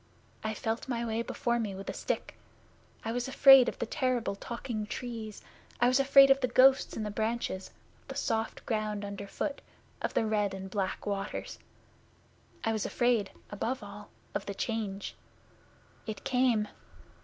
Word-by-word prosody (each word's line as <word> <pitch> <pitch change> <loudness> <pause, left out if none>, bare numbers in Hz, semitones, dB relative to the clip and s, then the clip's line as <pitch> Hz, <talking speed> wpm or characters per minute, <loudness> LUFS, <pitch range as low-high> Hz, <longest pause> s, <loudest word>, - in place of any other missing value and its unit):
I 220 0 -2
felt 225 +4 -2
my 235 -2 -1
way 225 0 -1
before 235 0 -1
me 210 -4 -2
with 195 +1 -8
a - - -2
stick. - - -3 0.7
I 225 - -1
was 245 +2 -2
afraid 270 -1 +8
of - - -8
the - - -2
terrible 245 -3 0
talking 230 0 -5
Trees. 225 -3 -6 0.4
I 240 - +5
was 255 +2 +4
afraid 275 0 +7
of 270 - +5
the 255 - +2
ghosts 260 +2 +5
in 220 - -2
the 210 - -3
branches; 220 -3 -2 0.3
of - - -32
the - - -7
soft 225 0 -2
ground 215 -2 -1
underfoot; 200 +8 -4 0.4
of - - -2
the 225 - +3
red 210 -2 +1
and 190 0 -7
black 195 -2 -2
waters. 200 0 -4 1.0
I 225 - +1
was 215 -3 -1
afraid, 240 -5 +2 0.2
above 225 +4 -2
all, 205 +1 -10 0.2
of - - -3
the 200 - -4
Change. 205 -3 -3 0.9
It 215 -2 -5
came! 250 -5 +2
225 Hz, 165 wpm, -30 LUFS, 205-245 Hz, 1.0 s, afraid